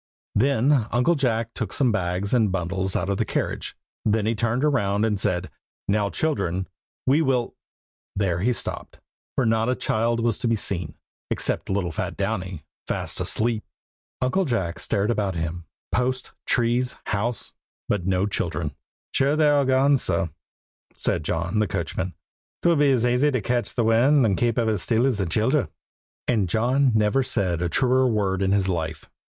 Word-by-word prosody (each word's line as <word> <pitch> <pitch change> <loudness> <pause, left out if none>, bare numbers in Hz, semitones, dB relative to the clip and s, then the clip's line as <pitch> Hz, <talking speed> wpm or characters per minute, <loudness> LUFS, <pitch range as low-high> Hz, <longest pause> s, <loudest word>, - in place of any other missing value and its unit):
Then 130 +1 +3
Uncle 125 +8 +3
Jack 115 -6 0
took 110 -5 -4
some 130 -4 +2
bags 95 0 -1
and 110 -5 +3
bundles 95 +1 -2
out 90 - 0
of 100 -1 0
the - - +2
carriage; - - -3 0.3
then 110 0 +1
he 110 - +2
turned 115 +3 0
round 105 -8 +2
and 105 -3 0
said 90 -3 -1 0.4
"Now, 100 0 +1
children, 95 - -1 0.4
we 140 +5 +4
will" 130 -5 +1 0.6
There 95 -4 0
he 115 +7 +2
stopped, 120 - -4 0.4
for 130 - +2
not 115 +1 +2
a 130 - +2
child 115 +1 0
was 115 -2 0
to - - -1
be 115 - +3
seen, 90 -7 -3 0.3
except - - -1
little 95 -3 0
fat - - -4
Downy, 95 -5 -3 0.2
fast - - -2
asleep. 110 -1 0 0.6
Uncle 135 +10 +2
Jack 95 - -1
stared 100 +3 0
about 100 -5 -1
him. 80 +1 -3 0.3
Posts, 130 +1 -1 0.2
trees, 120 +1 +1
house, 110 +4 -2 0.3
but 95 -4 -1
no 95 0 +2
children. 80 -6 -2 0.4
"Sure 140 +2 +2
they're 150 -2 +4
all 140 - +3
gone, 135 +2 +4
surr," 85 -6 0 0.6
said - - -1
John 85 +7 -1
the 110 - +2
coachman. 95 0 -3 0.5
"'Twould 170 -3 +4
be 145 -1 +5
as 125 -3 +2
aisy 125 +4 +3
to 130 -3 0
ketch 120 0 -1
the 120 - +2
wind 120 +5 +4
and 100 -3 +2
kape 120 +3 +1
it 110 -3 +2
still 115 +6 +1
as 125 -6 +1
thim 95 -4 -1
childher." - - +1 0.6
And 105 -7 +1
John 125 +7 +2
never 110 +5 +3
said 95 -9 -1
a 90 - 0
truer 130 +5 +3
word 100 -5 0
in 95 0 +2
his 100 -1 +2
life. 80 -4 -3
110 Hz, 170 wpm, -24 LUFS, 95-125 Hz, 0.6 s, be